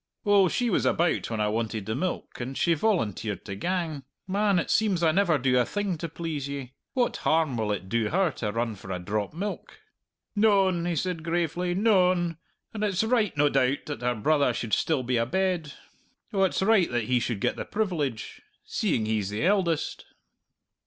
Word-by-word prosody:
"Oh, 200 -2 +5
she 240 +6 0
was - - +2
about 170 0 +1
when 115 -2 -3
I 105 - +2
wanted 110 -1 -2
the 110 - -2
milk, 170 0 -3
and 130 +2 -5
she 170 - +3
volunteered 115 - -1
to 100 - -5
gang. 165 - -2 0.3
Man, 200 0 +2
it 170 - -1
seems 200 -6 +2
I 160 - +5
never 175 -2 +3
do 125 -1 +2
a - - +4
thing 205 +4 -2
to 170 - -4
please 160 -4 -4
ye! 135 -2 -6 0.2
What 245 -2 +1
harm 155 -4 +1
will 110 -2 -1
it 95 -2 -3
do 115 +1 0
her 180 0 +2
to 105 -3 -2
run 115 +1 -1
for 95 -1 -12
a 90 - -1
drop 100 +3 -2
milk?" 200 +6 -6 0.6
"Noan," 195 -5 +3
he 175 - 0
said 175 +1 -2
gravely, 175 +2 -1
"noan. 180 -5 +3 0.4
And 215 -1 -3
it's 200 -1 +1
right, 220 - +1
no 145 +1 +4
doubt, 135 -1 +1
that 145 -3 -5
her 125 0 0
brother 140 +2 +2
should 115 -3 -4
still 150 -5 +1
be 125 0 0
abed 160 +5 0 0.6
oh, 195 -1 +3
it's 190 - 0
right 210 -3 +4
that 120 -2 0
he 125 +2 +1
should 115 -3 -2
get - - 0
the - - -4
privilege 165 - -3 0.2
seeing 110 - 0
he's 110 -3 -1
the 105 +9 -2
eldest!" 180 -5 0
160 Hz, 195 wpm, -27 LUFS, 120-185 Hz, 0.6 s, Oh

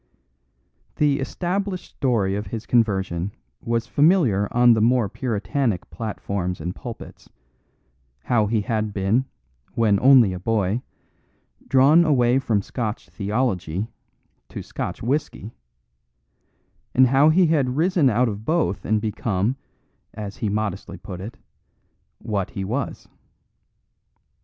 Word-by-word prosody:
The 145 -2 +2
established 185 +7 -3
story 115 -8 0
of 105 0 -3
his 115 +3 -6
conversion 100 -6 0 0.3
was 115 0 -1
familiar 140 - +3
on 120 0 +5
the 110 - +1
more 120 -1 +3
puritanic 110 -1 -2
platforms 95 -1 -4
and 85 +3 -4
pulpits, 120 -4 -10 0.9
how 110 -4 +2
he 110 0 +1
had 110 -1 -2
been, 105 +7 +1 0.5
when 105 -4 +3
only 125 -6 +6
a 90 - -5
boy, 105 +2 0 0.9
drawn 140 +6 +5
away 130 -5 +3
from 110 -6 0
Scotch 110 -2 -4
theology 100 -3 -2 0.6
to - - -7
Scotch - - -5
whisky, 130 -4 -2 1.4
and 130 - +7
how 135 +4 +4
he 180 +3 +4
had 140 -5 +1
risen 170 -4 +3
out 125 +2 +2
of 105 -1 -4
both 95 - 0
and 110 0 +1
become 105 +1 -1 0.6
(as 100 -2 -6
he 110 - -2
modestly 100 -2 -3
put 90 -2 -8
it) 110 +5 -8 0.8
what 100 -4 -3
he 95 - -5
was. 125 +8 -4
115 Hz, 120 wpm, -23 LUFS, 100-130 Hz, 1.4 s, and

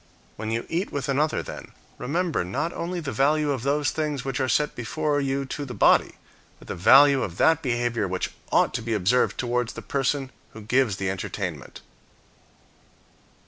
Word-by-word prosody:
When 110 +1 -5
you 115 +1 -2
eat 175 +5 -2
with 140 - -3
another, 150 +3 +1
then, - - -9 0.3
remember 170 - -1
not 105 - -3
only 175 +1 -4
the 140 -3 -4
value 145 +5 +2
of 135 -4 -2
those 145 +2 +1
things 150 -4 -3
which 135 -2 -2
are 130 - 0
set 150 0 +1
before 145 +4 -1
you 135 0 -1
to 145 +2 -5
the 125 -4 -7
body, - - +4 0.4
but - - -17
the - - -4
value 135 +9 +6
of 90 -2 -4
that 160 -1 +4
behavior 120 -5 -1
which 90 0 -3 0.2
ought - - +3
to - - -2
be 115 0 -2
observed 110 +6 +2
towards 125 -1 -1
the - - -8
person 135 0 -1 0.2
who 110 - -10
gives 115 -2 +1
the 95 -1 -1
entertainment. 95 - -5
135 Hz, 180 wpm, -25 LUFS, 115-145 Hz, 0.4 s, value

